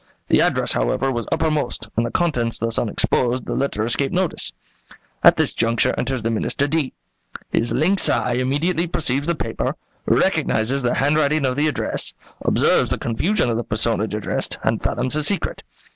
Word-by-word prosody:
The - - +4
address, - - +1
however, - - 0
was 120 -2 -3
uppermost, 155 -5 -1
and, 115 - +2
the 120 - -2
contents 125 -8 0
thus 115 0 0
unexposed, 120 +2 0
the - - -3
letter 135 -6 -1
escaped 135 +6 0
notice. 185 -3 -1 0.7
At - - +7
this - - +2
juncture 115 0 +1
enters 125 -2 -2
the 115 - 0
Minister 135 +5 0
D. 155 -3 -1 0.6
His 115 - +1
lynx 185 +4 +3
eye 125 - +1
immediately 145 +8 0
perceives 145 -3 -1
the 170 - +1
paper, - - -3 0.3
recognizes 120 +5 +1
the 120 -1 0
handwriting 150 +1 +2
of 130 -1 0
the 150 +2 +1
address, 150 - -1 0.3
observes - - +2
the - - 0
confusion 125 - 0
of 115 - -1
the 120 - -2
personage 110 -1 0
addressed, 105 - -2
and - - 0
fathoms 125 +2 -1
her 155 - +3
secret. 185 +4 0
130 Hz, 170 wpm, -21 LUFS, 115-155 Hz, 0.7 s, At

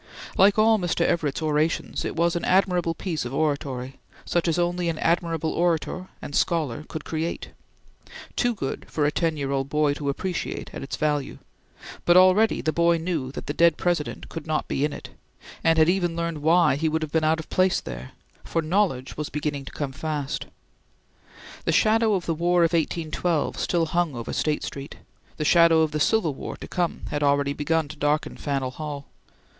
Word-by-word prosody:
Like 200 +2 +5
all 220 0 +5
Mr. 175 -1 0
Everett's 155 -2 0
orations, 155 +1 0
it - - -3
was 170 +1 +2
an 170 - -2
admirable 180 -3 +2
piece 165 -2 -3
of 125 +2 -5
oratory, 135 -4 -2 0.3
such 175 0 0
as 165 - +1
only 175 0 0
an 165 - -2
admirable 165 -1 0
orator 175 +2 0 0.2
and 145 - -6
scholar 155 -6 0
could 155 - -6
create; 160 +1 -3 0.9
too 245 -1 +1
good 135 -9 -4
for 150 - 0
a 150 - +2
ten 160 0 0
year 140 -1 -2
old 135 0 -1
boy 150 -1 +2
to 145 -1 -3
appreciate 180 +5 -3
at - - -6
its 135 - -4
value; 150 -2 -1 0.7
but 175 +1 +5
already 185 +4 +5
the 155 - 0
boy 170 +1 +3
knew 160 -6 -2
that - - -6
the 145 - -3
dead 170 +2 +4
President 175 -4 -1
could 165 -1 -8
not 155 -1 -1
be 135 - -1
in 150 - +1
it, - - -8 0.5
and 165 0 +4
had 160 0 +5
even 175 -2 +1
learned 170 -2 -2
why 165 -1 +4
he 160 +2 +1
would 160 0 -1
have 155 - -5
been 160 -1 +1
out 160 +1 +2
of 160 - -7
place 185 0 +3
there; 65 0 -8 0.3
for 165 - -1
knowledge 160 -6 0
was 150 0 -4
beginning 145 -2 -3
to - - -8
come 145 -3 -4
fast. 150 0 -3 1.2
The - - +2
shadow 220 -1 +3
of 180 - -2
the 165 - 0
War 175 +2 +2
of 165 +1 +2
1812 165 0 -1
still 170 -2 +1
hung 170 -3 0
over 115 -1 -5
State 150 -1 0
Street; 140 +1 -6 0.4
the 150 - -2
shadow 170 0 +6
of 160 -1 +1
the 155 - -2
Civil 170 -1 +2
War - - -7
to - - -9
come 175 -2 -2
had 145 - -2
already 140 -1 +2
begun 155 +2 0
to 150 - -9
darken 150 +1 0
Faneuil 135 -3 -2
Hall. 145 0 -6
160 Hz, 195 wpm, -25 LUFS, 145-175 Hz, 1.2 s, shadow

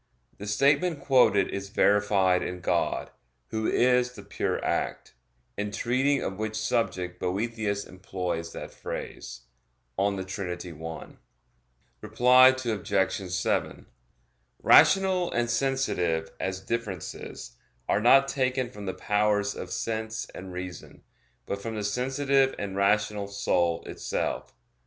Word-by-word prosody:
The 105 - -7
statement 145 - +2
quoted 125 -8 +4
is 100 0 -5
verified 100 -3 +3
in 90 0 -4
God, - - 0 0.4
Who 110 0 -1
is 125 0 +3
the 105 - -11
Pure 100 - -2
Act; - - -2 0.4
in 105 +1 -2
treating 130 +6 +1
of 95 +1 -4
which 110 0 -3
subject 90 -5 -1
Boethius 100 +1 -2
employs 90 -3 -4
that - - -8
phrase - - -7 0.6
(De 100 -1 0
Trin. 90 -4 -6
i). 80 -1 -6 1.0
Reply 125 +4 +6
Obj. 105 -7 0
7: 90 +1 -1 0.8
Rational 190 -2 +5
and 120 0 +1
sensitive, 90 -12 0
as 95 0 -3
differences, 95 - -5 0.3
are 105 - +2
not 135 +4 +6
taken 130 -2 -1
from 105 -4 -8
the 95 - -3
powers 105 -1 +1
of - - -7
sense 110 0 -3
and 95 0 -8
reason, 90 -2 -8 0.4
but 100 0 -4
from 115 +1 -5
the 105 - -3
sensitive 135 +5 +1
and 100 -1 -4
rational 105 +1 +1
soul 85 -4 0
itself. - - -3
105 Hz, 120 wpm, -27 LUFS, 95-125 Hz, 1.0 s, Reply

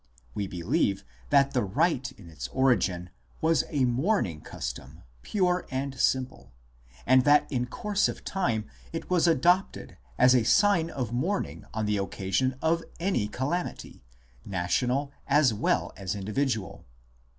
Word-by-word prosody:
We 100 -2 -3
believe 95 - 0 0.3
that 140 0 +4
the 125 - +1
rite 135 - 0
in 95 - -15
its 75 -7 -7
origin 95 - +1 0.3
was 160 -4 +2
a 140 -4 +1
mourning 125 - 0
custom - - -7 0.2
pure 180 -3 0
and 135 +1 -3
simple, 130 0 0 0.5
and 130 +1 +5
that 145 0 +5
in 125 -2 -1
course 205 - 0
of - - -7
time 125 - -1 0.3
it - - -6
was 175 -1 +3
adopted 175 +5 +1 0.2
as 125 0 +6
a 125 -3 +4
sign 195 - +3
of 125 -6 -4
mourn 175 +12 0
ing - - -11
on 110 -1 -2
the 105 0 +1
occasion 100 +6 -1
of 165 +1 +2 0.2
any 175 - 0
calamity, 135 - -4 0.4
national 125 +9 -1 0.2
as 140 -4 +4
well 105 - 0
as 95 0 -4
individual. 105 0 -2
130 Hz, 140 wpm, -27 LUFS, 105-165 Hz, 0.5 s, as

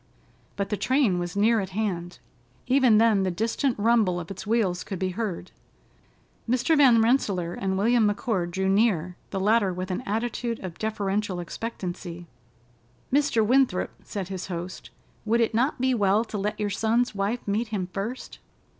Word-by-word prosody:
But 200 0 -2
the 210 - -1
train 255 -9 +2
was 175 +2 -4
near 220 +3 +3
at 190 -2 -3
hand. 175 -5 -2 0.5
Even 255 -4 +4
then 220 -3 +4
the 190 - +1
distant 230 - -1
rumble 210 -4 +2
of 170 +2 -7
its 195 +2 -8
wheels 205 -6 +1
could 195 - -5
be 185 +1 -1
heard. 185 -3 -4 1.0
Mr. 255 +6 +2
Van 250 -6 +6
Rensselaer 200 -8 +1
and 190 0 -2
William 225 +2 +3
McCord 205 -4 -1
drew 190 +2 -1
near, 190 -4 +2
the 195 - -3
latter 205 0 +3
with 185 +1 -4
an 185 - -2
attitude 230 +2 -2
of 180 -3 -7
deferential 205 -3 -1
expectancy. 175 -2 -6 0.9
"Mr. 280 -6 +3
Winthrop," 250 -5 +2
said 195 -3 -5
his 190 -2 -5
host, 175 0 -6 0.3
"would 225 +2 +1
it 230 -1 +1
not 250 +6 +1
be 260 +1 +2
well 210 0 +2
to 215 - -5
let 210 +2 -2
your 205 -1 -1
son's 225 +4 +1
wife 205 +4 -2
meet 215 +4 0
him 205 -4 -2
first?" 225 +6 -5
210 Hz, 165 wpm, -26 LUFS, 185-230 Hz, 1.0 s, Van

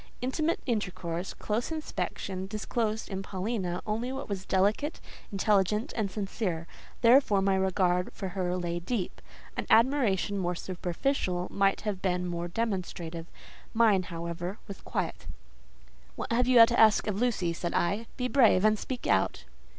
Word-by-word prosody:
Intimate 305 +6 0
intercourse, 185 -7 -2
close 225 +7 -2
inspection, 195 -11 -4
disclosed 215 +1 -2
in 190 -1 -4
Paulina 190 -2 -3
only 225 +4 -2
what 270 +1 -5
was 195 -3 -5
delicate, 205 - +1 0.3
intelligent, 210 - +1
and 210 -3 0
sincere; 190 -4 -3 0.4
therefore 235 -4 +5
my 195 0 +2
regard 185 -1 +1
for 190 - -5
her 180 -1 -1
lay 175 -1 -2
deep. 185 +2 -3 0.3
An - - -3
admiration 225 -5 +3
more 175 -1 -1
superficial 180 +1 -2
might 195 0 +2
have 205 -3 -3
been 180 -1 0
more 175 -1 -3
demonstrative; 175 -5 -3 0.5
mine, 220 -4 +5
however, 170 +2 -5
was 200 - -8
quiet. - - -4 0.9
"What - - -5
have 245 +2 +2
you 245 -3 +9
to 235 +1 0
ask 220 -2 +6
of 210 0 -2
Lucy?" 200 -9 +1
said 170 +1 -3
I; 200 +6 0
"be 250 - 0
brave, 230 -7 +5
and 215 -1 +4
speak 255 -2 -5
out." 95 -8 +1
195 Hz, 145 wpm, -29 LUFS, 180-230 Hz, 0.9 s, you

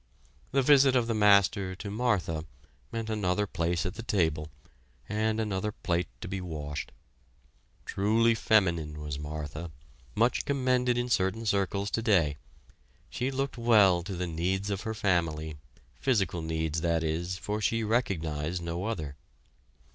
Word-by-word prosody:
The 135 0 +3
visit 135 -1 +6
of 125 -2 +3
the 115 - -1
Master 100 -2 +4
to 100 +2 -6
Martha 100 -9 0 0.5
meant 115 -1 -3
another 105 -2 0
place 85 -3 -1
at 90 - -2
the - - -7
table, 80 -9 0 0.6
and 110 +1 0
another 105 -1 -1
plate 90 -3 -1
to - - -5
be 95 0 -3
washed. 75 -4 -5 0.9
Truly 115 +4 +3
feminine 85 -9 +2
was 75 -2 -5
Martha, 75 +2 -5 0.5
much 120 +3 +2
commended 125 -3 +1
in 120 0 0
certain 105 0 0
circles 100 0 0
today. 95 - +2 0.7
She 125 - -1
looked 135 -1 -3
well 105 -7 +5
to 95 +2 -5
the 90 +1 -2
needs 90 +4 -1
of 100 0 -2
her 110 -1 -4
family, 80 -7 0 0.4
physical 100 -9 +1
needs, 80 -1 -2
that 85 -1 +1
is, 85 +3 -2
for 105 +3 -3
she 115 +1 +1
recognized 85 -8 -1
no 85 +3 -3
other. 80 -11 -4
95 Hz, 140 wpm, -29 LUFS, 85-110 Hz, 0.9 s, visit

